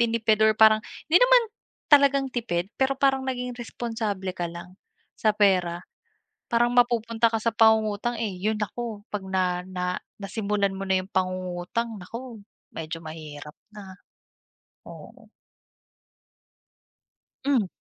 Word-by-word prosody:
tinipid 225 -2 +2
or 220 - +5
parang 220 0 +6 0.3
hindi 325 - +5
naman - - +6 0.5
talagang 280 -1 +6
tipid, 190 -7 -2
pero 265 0 +2
parang 270 -1 +2
naging 250 -1 -3
responsable 225 -5 -4
ka 175 -1 -2
lang 175 +2 -10 0.4
sa 215 - +2
pera. 180 -4 +2 0.7
Parang 240 0 +3
mapupunta 230 -2 +3
ka 225 - 0
sa 230 - +2
pangungutang, 220 0 +3
eh. 215 -4 -2
'Yun 215 +3 -1
ako, 215 0 -5
'pag 210 -2 -3
na 180 -1 0
na 185 -1 -4 0.4
nasimulan 200 -1 -1
mo 195 - -6
na 190 -1 +2
'yong 190 - -14
pangungutang, 185 +4 -2
nako, 230 +4 -9 0.3
medyo 165 0 -5
mahirap 155 -2 -9 0.2
na. 195 -3 -10 0.9
Oo. - - -13 2.1
Hmm. 265 -7 +2
215 Hz, 125 wpm, -25 LUFS, 185-235 Hz, 2.1 s, parang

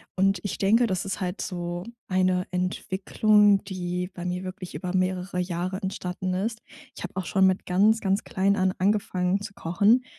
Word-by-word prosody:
und 195 -1 +2
ich 205 - -3
denke, 225 +5 +4
das 185 -3 -2
ist 195 +1 -4
halt 180 +2 -2
so 175 -1 -4 0.2
eine 185 -1 +1
Entwicklung, 195 +3 +2
die 180 -1 -3
bei 175 - -6
mir 180 +1 -2
wirklich 185 0 -7
über 180 +4 -4
mehrere 185 0 -1
Jahre 180 +1 -2
entstanden 185 -1 -3
ist. 220 +4 -2 0.4
Ich - - -8
hab 180 - -6
auch 190 -1 -2
schon 190 -1 +3
mit 185 0 +2
ganz, 210 +5 +4
ganz 195 0 0
klein 195 +1 +1
an 185 -1 +1
angefangen 190 -1 +1
zu 200 -1 -7
kochen 205 +10 +3
185 Hz, 175 wpm, -26 LUFS, 180-200 Hz, 0.4 s, denke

